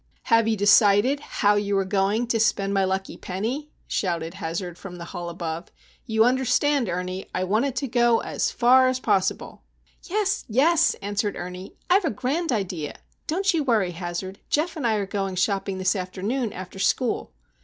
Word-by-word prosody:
"Have 230 -1 +3
you 220 -1 +1
decided—how 205 +2 +4
you 205 -1 0
are 195 - +1
going—to 210 +5 +1
spend 200 -2 +1
my 195 -1 +2
lucky 190 0 -2
penny?" 230 +11 -4 0.2
shouted 170 -3 -2
Hazard 175 0 -4
from 180 0 -9
the 170 -1 -8
hall 175 0 -6
above. 170 0 -5 0.4
"You 220 -1 +3
understand, 260 0 +2
Ernie,—I 180 +1 -3
want 215 +7 +1
it 270 -3 -2
to 270 +2 -2
go—as 240 -1 +1
far 255 +2 +5
as 255 0 0
possible!" 190 -6 -1 0.4
"Yes! 405 +1 -1
yes!" 305 +8 +3
answered 205 +1 -1
Ernie. 180 +2 -7
"I've 375 +1 +4
a - - +2
grand 270 +8 -1
idea! 180 -9 -2 0.3
Don't 385 +4 +1
you 320 -3 +1
worry, 220 -9 +1
Hazard. 175 +2 -5
Geof 320 +3 0
and 290 -7 -1
I 220 - +2
are 205 -2 -1
going 195 -1 -3
shopping 195 +1 0
this 185 +3 +1
afternoon 200 +6 -2
after 185 +1 -8
school." 240 +4 0
205 Hz, 165 wpm, -24 LUFS, 185-255 Hz, 0.4 s, far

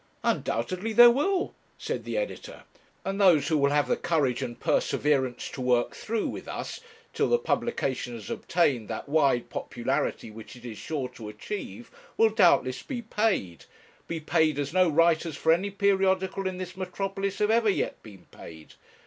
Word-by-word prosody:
'Undoubtedly 185 - -1
there 240 +1 +9
will,' 360 +9 0 0.2
said - - -4
the - - -3
editor; - - -5 0.4
'and 195 +1 -2
those 175 -7 +5
who 160 - +2
will 140 0 +3
have 145 0 +2
the - - +2
courage 140 -7 0
and 120 -3 -5
perseverance 130 -4 0
to 130 - -7
work 125 -1 +1
through 225 0 -2
with - - -7
us, - - -5 0.3
till - - +1
the 480 - +4
publication 135 - -2
has 110 -3 -8
obtained 140 -10 0
that - - -5
wide 140 -5 +2
popularity 120 -2 -2
which 110 +3 -11
it 120 0 -13
is 115 -3 -7
sure 145 -5 -3
to 115 -4 -10
achieve, 210 - -7 0.3
will 225 -1 +5
doubtless 175 - +3
be 245 -4 -5
paid, 210 - -1 0.4
be 165 - -3
paid 155 -1 +1
as 145 +1 -3
no 185 -1 +4
writers 165 0 +2
for 160 - +2
any 190 +4 -1
periodical 195 -1 +1
in 185 -1 -4
this 185 0 -6
metropolis 195 +1 -3
have 210 +1 +2
ever 225 -1 +3
yet 200 - -1
been 100 -5 -14
paid. 80 -1 -12
165 Hz, 170 wpm, -27 LUFS, 130-200 Hz, 0.4 s, there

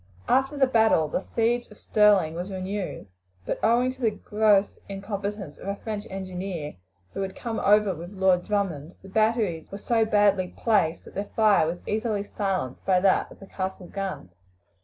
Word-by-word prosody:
After 270 +2 +2
the 275 - +5
battle 220 -10 +3
the 150 - -2
siege 235 +3 0
of 210 - -15
Stirling 205 -7 +3
was 175 +4 -5
renewed; 190 +1 -4 0.4
but - - -2
owing 240 +3 +3
to 260 +1 -13
the 230 - +3
gross 210 -1 +2
incompetence 200 -3 -5
of - - -9
a 200 - -1
French 210 0 -5
engineer, 185 -4 -5 0.4
who - - -3
had 190 -1 -4
come 230 -2 -4
over 210 -1 +4
with 170 +1 -8
Lord 190 -2 +2
Drummond, 180 -6 -2
the 195 - -11
batteries 215 -5 0
were 200 - -5
so 225 +2 +1
badly 205 -4 +2
placed 205 -8 +1
that - - -13
their 200 +1 -4
fire 210 -7 +4
was 175 +2 -4
easily 215 -1 -1
silenced 190 - -3
by 185 -1 +3
that 190 0 +2
of - - -14
the 195 - -11
castle 190 -1 -5
guns. 190 - -5
200 Hz, 180 wpm, -26 LUFS, 185-215 Hz, 0.4 s, the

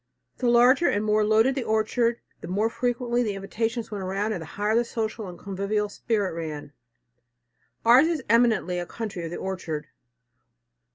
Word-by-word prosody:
The 245 - +1
larger 245 +7 +5
and 205 +1 0
more 215 0 +3
loaded 220 +5 +4
the 265 -2 -2
orchard, 230 +2 +1 0.2
the - - -7
more 210 +5 0
frequently 240 0 0
the 210 -4 -1
invitations 225 +4 -3
went 200 -2 -4
round 200 +4 -1
and 180 - -4
the 160 - -8
higher 210 +2 +1
the 235 - +4
social 220 -2 -4
and 175 -1 -9
convivial 200 +2 -2
spirit 205 -3 -1
ran. 150 -3 -6 1.1
Ours 250 +6 +7
is 325 -6 -1
eminently 225 -6 +3
a 175 - -5
country 210 -6 -5
of - - -4
the 175 - -5
orchard. 170 -6 -4
215 Hz, 170 wpm, -25 LUFS, 190-235 Hz, 1.1 s, Ours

